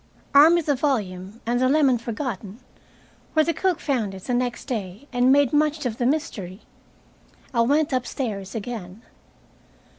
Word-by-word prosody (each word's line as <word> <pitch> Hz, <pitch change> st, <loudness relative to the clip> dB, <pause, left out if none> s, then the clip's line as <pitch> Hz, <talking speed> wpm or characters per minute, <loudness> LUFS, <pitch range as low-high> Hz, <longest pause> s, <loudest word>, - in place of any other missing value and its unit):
Armed 300 Hz, +4 st, +8 dB
with 340 Hz, -3 st, 0 dB
the 290 Hz, -, +2 dB
volume, 210 Hz, -7 st, -2 dB
and 240 Hz, +1 st, 0 dB
the 255 Hz, 0 st, +3 dB
lemon 275 Hz, -4 st, +3 dB
forgotten 230 Hz, -3 st, -5 dB, 0.7 s
where 310 Hz, -1 st, +4 dB
the 335 Hz, -, +1 dB
cook 370 Hz, -2 st, 0 dB
found 230 Hz, -9 st, -1 dB
it 190 Hz, -, -10 dB
the 250 Hz, -, -2 dB
next 245 Hz, 0 st, -1 dB
day 210 Hz, +1 st, -5 dB
and 245 Hz, +1 st, +4 dB
made 285 Hz, -1 st, +4 dB
much 300 Hz, 0 st, +1 dB
of 230 Hz, -2 st, -3 dB
the 240 Hz, -, +2 dB
mystery 230 Hz, -, -3 dB, 0.9 s
I 235 Hz, -, +3 dB
went 290 Hz, +5 st, +2 dB
upstairs 235 Hz, -6 st, -3 dB
again. 215 Hz, -2 st, -6 dB
245 Hz, 155 wpm, -24 LUFS, 215-285 Hz, 0.9 s, Armed